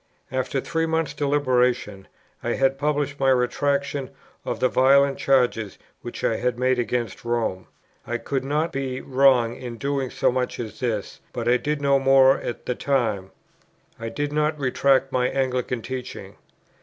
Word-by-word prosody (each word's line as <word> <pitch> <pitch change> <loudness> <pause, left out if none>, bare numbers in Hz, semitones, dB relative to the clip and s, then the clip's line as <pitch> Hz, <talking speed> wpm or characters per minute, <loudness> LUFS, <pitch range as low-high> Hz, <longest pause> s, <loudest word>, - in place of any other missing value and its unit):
After 130 +1 -1
three 165 +4 -1
months' 160 -1 -1
deliberation 125 -8 0 0.4
I 120 - 0
had 135 0 +1
published 145 -1 -1
my 135 -1 +3
retractation 140 +1 0 0.3
of - - -3
the 130 - +3
violent 135 +2 +4
charges 125 -6 +1 0.2
which - - -8
I - - +1
had 125 -1 -1
made 130 0 +1
against 120 -3 -2
Rome: 115 -6 -2 0.4
I 120 - -1
could 135 +2 -3
not 150 +4 0
be 135 -2 -3
wrong 130 -4 +3
in 120 -2 -7
doing 135 +1 -2
so - - +1
much 125 0 -2
as 115 -3 -6
this; 110 -5 -3
but 120 -1 -3
I 125 +1 +5
did 150 +1 -3
no 140 -1 +4
more 135 0 +5
at 120 - -6
the 125 - 0
time: 115 -8 -1 0.7
I 115 0 -4
did 145 +5 -3
not 150 0 +1
retract 135 0 +2
my 125 -1 +1
Anglican 125 -3 -1
teaching. 130 -1 -6
130 Hz, 160 wpm, -24 LUFS, 120-140 Hz, 0.7 s, I